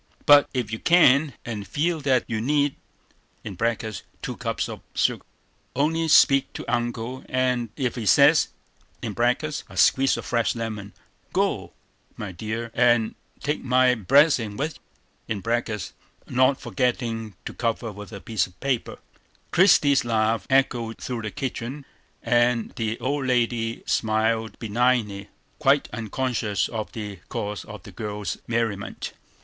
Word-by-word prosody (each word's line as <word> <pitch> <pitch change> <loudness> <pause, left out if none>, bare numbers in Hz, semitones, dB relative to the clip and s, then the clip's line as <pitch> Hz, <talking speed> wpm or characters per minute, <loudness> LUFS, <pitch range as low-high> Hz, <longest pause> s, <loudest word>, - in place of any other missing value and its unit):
But 145 -1 +7
ef 120 -4 -1
you 110 - -3
can't, 150 -4 +5
and 105 -4 -5
feel 165 +2 0
that 130 -3 +2
you 110 -2 -2
need 145 +2 +1 0.7
(two 110 +2 -4
cups - - -2
of - - -8
sugar), - - +1 0.5
only 160 +4 +1
speak 140 -3 +5
to - - -6
Uncle, 120 +1 -2
and 125 -2 0
ef 130 -4 -1
he 115 -4 -4
says - - +6 0.6
(a 120 +7 0 0.2
squeeze 135 +9 +4
of - - -6
fresh 120 0 0
lemon), 110 -3 -5 0.4
go, - - 0 0.4
my 105 -3 -5
dear, 110 +5 -5
and 120 -2 +3 0.3
take 150 +1 -2
my 125 0 +4
blessin' 125 - +3
with 155 +3 -3 0.5
you 110 -3 -2 0.9
(not 130 +2 +3
forgettin' 115 -1 -2
to - - -5
cover 115 -1 -2
with 105 +1 -10
a 100 - -7
piece 105 -2 -1
of 90 0 -22
paper)." 130 -4 -2 0.5
Christie's 150 -7 +5
laugh 110 -3 0
echoed 120 -4 +1
through 125 -3 -4
the 110 - -4
kitchen; 130 +4 -5 0.4
and 120 0 +2
the 110 0 -3
old 140 0 -1
lady 120 -2 0
smiled 110 0 0
benignly, 110 -3 0 0.3
quite 140 -1 +3
unconscious 115 -2 -1
of 110 -2 -4
the 105 -3 -6
cause 105 0 -4
of 105 -4 -10
the - - -11
girl's 105 -2 -4
merriment. 115 -4 -2
120 Hz, 130 wpm, -24 LUFS, 110-130 Hz, 0.9 s, But